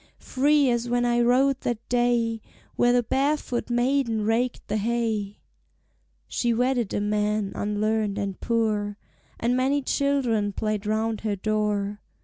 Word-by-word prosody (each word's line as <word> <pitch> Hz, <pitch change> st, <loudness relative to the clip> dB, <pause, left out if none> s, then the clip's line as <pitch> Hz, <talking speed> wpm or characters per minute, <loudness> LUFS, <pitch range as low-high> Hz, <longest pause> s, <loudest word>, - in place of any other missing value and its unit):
"Free 285 Hz, +2 st, +2 dB
as 240 Hz, 0 st, -1 dB
when 245 Hz, 0 st, +1 dB
I 240 Hz, 0 st, +2 dB
rode 260 Hz, +3 st, +3 dB
that 235 Hz, -2 st, -3 dB
day 240 Hz, -2 st, +1 dB, 0.3 s
Where 240 Hz, -, +3 dB
the 245 Hz, 0 st, +3 dB
barefoot 270 Hz, 0 st, -1 dB
maiden 240 Hz, -3 st, +1 dB
raked 240 Hz, +3 st, 0 dB
the 215 Hz, -, -1 dB
hay." 220 Hz, -2 st, -1 dB, 0.9 s
She 235 Hz, -1 st, 0 dB
wedded 245 Hz, -2 st, 0 dB
a -, -, +1 dB
man 210 Hz, 0 st, 0 dB
unlearned 210 Hz, 0 st, -1 dB
and 200 Hz, -2 st, -3 dB
poor, 215 Hz, -3 st, 0 dB, 0.4 s
And 240 Hz, +2 st, +1 dB
many 270 Hz, +2 st, +1 dB
children 250 Hz, -8 st, 0 dB
played 215 Hz, 0 st, -2 dB
round 220 Hz, 0 st, -1 dB
her 215 Hz, -2 st, -1 dB
door. 210 Hz, 0 st, -1 dB
230 Hz, 135 wpm, -25 LUFS, 210-245 Hz, 0.9 s, rode